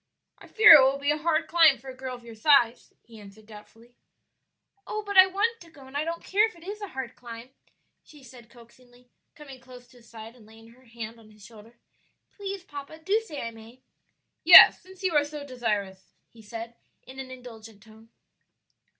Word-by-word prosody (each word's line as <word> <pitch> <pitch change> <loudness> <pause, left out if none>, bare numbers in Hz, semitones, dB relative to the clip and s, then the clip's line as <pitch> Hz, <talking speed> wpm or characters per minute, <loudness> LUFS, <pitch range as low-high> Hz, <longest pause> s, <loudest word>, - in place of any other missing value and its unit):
"I - - -16
fear 430 -6 +7
it 300 - +9
will 265 +1 +1
be 285 +1 -1
a 300 - -1
hard 315 0 -1
climb 320 -5 +4
for 265 +3 -13
a - - -15
girl 255 -1 -7
of 245 - -16
your 230 -1 -12
size," 240 0 +1
he 225 -2 -16
answered 205 +1 -16
doubtfully. 225 +2 -17 0.9
"Oh, 430 0 -5
but 405 0 -6
I 375 0 +8
want 435 +5 -2
to 335 - -16
go, 285 -4 -17
and 265 +1 -16
I 290 - -1
don't 335 +1 -6
care 420 +3 +1
if 440 - -15
it 335 - -18
is 410 +3 -9
a 410 - -6
hard 265 -7 -8
climb," 235 +1 -12 0.5
she 295 -3 -19
said 240 -2 -16
coaxingly, 245 +1 -22 0.2
coming 275 -3 -13
close 245 0 -16
to 245 - -21
his 235 -1 -21
side 225 +1 -12
and 225 -4 -20
laying 225 +1 -18
her 255 +3 -23
hand 230 -1 -10
on 220 -1 -19
his 210 -1 -18
shoulder. 225 +1 -17 0.6
"Please, 395 -2 -7
papa, 290 -1 -11
do 390 +7 -1
say 325 -11 -9
I 230 - -6
may." 230 +3 -17 0.6
"Yes, - - +9
since 375 +1 -17
you 370 -3 -1
are 295 - +3
so 290 0 -9
desirous," 210 -7 -5 0.2
he 230 - -18
said, 230 +2 -9 0.3
in 265 +1 -14
an 265 -1 -8
indulgent 225 -5 -13
tone. 220 0 -20
255 Hz, 210 wpm, -25 LUFS, 230-310 Hz, 0.9 s, it